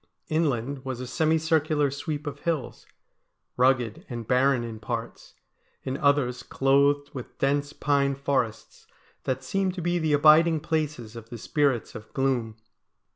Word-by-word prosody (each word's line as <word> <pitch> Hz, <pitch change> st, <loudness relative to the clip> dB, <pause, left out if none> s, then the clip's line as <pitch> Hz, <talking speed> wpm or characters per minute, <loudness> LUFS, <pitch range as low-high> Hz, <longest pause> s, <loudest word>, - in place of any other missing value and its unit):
Inland 140 Hz, -4 st, -1 dB
was 130 Hz, -2 st, -4 dB
a 130 Hz, -, -4 dB
semicircular 155 Hz, 0 st, +1 dB
sweep 145 Hz, +2 st, -4 dB
of 145 Hz, -, -5 dB
hills, 160 Hz, -7 st, -3 dB, 0.7 s
rugged 125 Hz, -3 st, +2 dB
and 120 Hz, -3 st, -6 dB
barren 130 Hz, -1 st, +3 dB
in 115 Hz, -2 st, -6 dB
parts; 115 Hz, +1 st, -6 dB, 0.5 s
in 130 Hz, -, -3 dB
others 140 Hz, -3 st, +1 dB
clothed 140 Hz, +1 st, +2 dB
with 130 Hz, -4 st, -8 dB
dense 145 Hz, +1 st, 0 dB
pine 140 Hz, -2 st, +1 dB
forests 130 Hz, -5 st, -2 dB, 0.4 s
that 130 Hz, 0 st, -2 dB
seemed 190 Hz, +6 st, -1 dB
to 180 Hz, -, -4 dB
be 175 Hz, +1 st, +1 dB
the 160 Hz, -2 st, +1 dB
abiding 155 Hz, +2 st, +6 dB
places 150 Hz, -7 st, -3 dB
of 115 Hz, -1 st, -10 dB
the 120 Hz, -, -7 dB
spirits 135 Hz, 0 st, 0 dB
of 110 Hz, -, -10 dB
gloom. 130 Hz, -5 st, 0 dB
140 Hz, 140 wpm, -26 LUFS, 125-150 Hz, 0.7 s, abiding